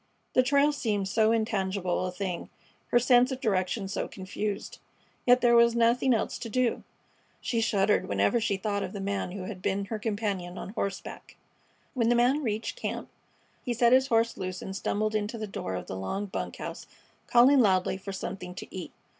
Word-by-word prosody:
The 255 - +6
trail 280 +3 +3
seemed 210 -9 -1
so 220 +3 +3
intangible 195 -5 0
a - - -4
thing, 180 -1 -4 0.4
her - - +3
sense 245 +1 +5
of 260 - -3
direction 195 -3 0
so 195 - -3
confused. 200 +2 -5 0.5
Yet 250 +1 +6
there 235 -1 +5
was 235 0 +5
nothing 235 +3 +3
else 225 - 0
to 230 - -6
do. 250 +1 +1 0.6
She 230 -2 -1
shuddered 205 -2 +2
whenever 100 - +2
she 205 -3 0
thought 200 +1 -2
of - - -4
the 200 - -5
man 195 -2 -2
who 195 -2 -5
had 185 -1 -7
been 200 +1 -1
her 215 +1 -4
companion 205 -5 -3
on - - -6
horseback. 200 -2 -5 0.6
When 235 -3 +1
the 240 - +4
man 250 +5 +3
reached 220 -3 -3
camp - - -4 0.5
he 245 -2 -2
set 235 +1 +4
his 260 +1 +5
horse 230 -2 +2
loose 185 -1 -4
and 190 - -6
stumbled 215 +2 -1
into 215 +2 -2
the 215 - -4
door 95 - -5
of 90 - -5
the - - -6
log 190 - -4
bunk - - -4
house, - - -7 0.4
calling 255 +4 +6
loudly 190 -5 +3
for 195 +1 -7
something 185 -1 -6
to - - -9
eat. 180 -3 -6
210 Hz, 190 wpm, -28 LUFS, 190-235 Hz, 0.6 s, The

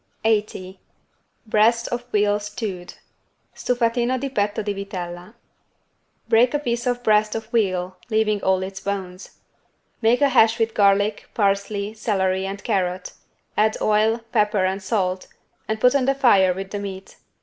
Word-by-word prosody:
80 205 -4 -1 0.7
BREAST 225 +2 +2
OF 240 0 -4
VEAL 205 0 +2
STEWED 205 -3 -6 0.6
(Stufatino 245 +1 0
di 275 +2 -3
petto 205 -3 -1
di 205 0 -2
vitella) 185 0 -7 0.9
Break 235 +4 +4
a - - +4
piece 240 -3 -2
of 245 0 -1
breast 215 -1 +2
of 225 0 -4
veal 185 -5 0
leaving 215 -2 +1
all 190 0 +1
its 190 0 -6
bones. 190 -2 -6 0.6
Make 235 +4 +3
a 285 - +5
hash 230 -3 +4
with 225 -1 0
garlic, 205 +1 +2
parsley, 200 0 0
celery 190 -3 -1
and 200 +1 -6
carrot; 185 -1 -2 0.4
add 215 +1 +2
oil, 215 +2 +2
pepper 210 -2 +2
and 190 +1 -2
salt 190 -2 -1 0.4
and 220 0 -2
put 250 +3 +4
on 275 -3 +2
the 275 +1 +2
fire 200 -9 +4
with 190 +1 -6
the 205 - -3
meat. 195 -1 -8
210 Hz, 150 wpm, -22 LUFS, 190-230 Hz, 0.9 s, a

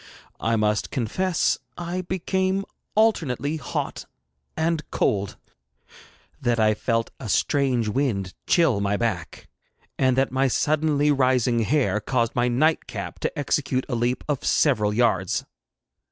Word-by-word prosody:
I 115 0 +1
must 105 -1 +1
confess 170 - 0 0.2
I 175 +1 -3
became 190 +2 -1 0.3
alternately 160 - +1
hot 150 - -4 0.5
and 160 0 +1
cold, 100 -2 0 1.0
that 120 -1 +1
I 110 -1 +4
felt 115 +1 -1
a 115 - -6
strange 130 -2 +1
wind 105 -6 -1
chill 155 - +3
my 100 0 0
back, 100 -7 -3 0.5
and 130 -1 +3
that 135 0 +2
my 135 +1 +2
suddenly 150 +2 +2
rising 130 -3 +2
hair 115 -3 +1
caused 115 0 0
my 120 0 +1
night 155 +7 +2
cap - - -6
to - - -3
execute 140 -2 0
a 140 - -4
leap 120 +1 0
of 145 -3 -2
several 110 -9 +2
yards. 105 -5 +1
130 Hz, 130 wpm, -24 LUFS, 115-150 Hz, 1.0 s, I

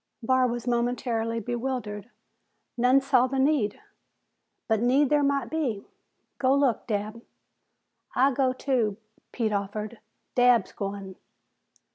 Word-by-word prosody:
Barr 260 +2 +3
was 240 -1 -4
momentarily 235 -1 -1
bewildered. 235 -2 -4 0.7
"None 250 +3 +4
saw 265 -2 +3
the 270 +1 -3
need." 265 -6 +1 0.9
"But 220 -2 +1
need 260 +4 +3
there 295 -1 +4
might 275 -3 0
be." 265 -11 -2 0.5
"Go 265 0 +3
look, 275 -5 +1
Dabb." 215 +1 -3 0.9
"I'll 270 +2 +4
gao, 260 0 +2
too," 245 -6 0 0.3
Pete 220 -3 -1
offered. 210 +3 -4 0.3
"Dabb's 245 -4 +4
goin'." 195 -1 -6
245 Hz, 115 wpm, -26 LUFS, 215-265 Hz, 0.9 s, None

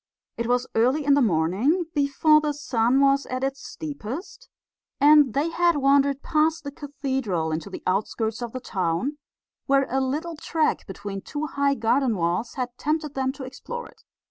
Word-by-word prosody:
It 235 0 -3
was 245 +1 +1
early 255 +6 +2
in 285 - +5
the 285 - +4
morning, 215 - +2
before 300 +1 +4
the 300 -1 -1
sun 255 -2 +1
was 275 0 +3
at 255 +1 -3
its 270 +1 -2
steepest, 310 - -7 0.5
and 290 -3 +6
they 300 +4 +1
had 345 0 +3
wandered 275 0 +3
past 315 +1 +1
the 285 - -5
cathedral 265 - -3
into 160 +5 -3
the 190 - -8
outskirts 220 +4 -1
of 240 -1 -4
the 255 - -5
town, 190 - -2 0.5
where 275 0 +4
a 265 +1 +1
little 305 +6 -2
track 315 0 -1
between 195 0 -6
two 295 +7 -4
high 280 -1 +1
garden 240 +1 +1
walls 175 +7 -1
had 250 -2 -4
tempted 305 -1 -1
them 265 -1 0
to 280 - -8
explore 480 - -7
it. - - -20
275 Hz, 170 wpm, -25 LUFS, 230-295 Hz, 0.5 s, and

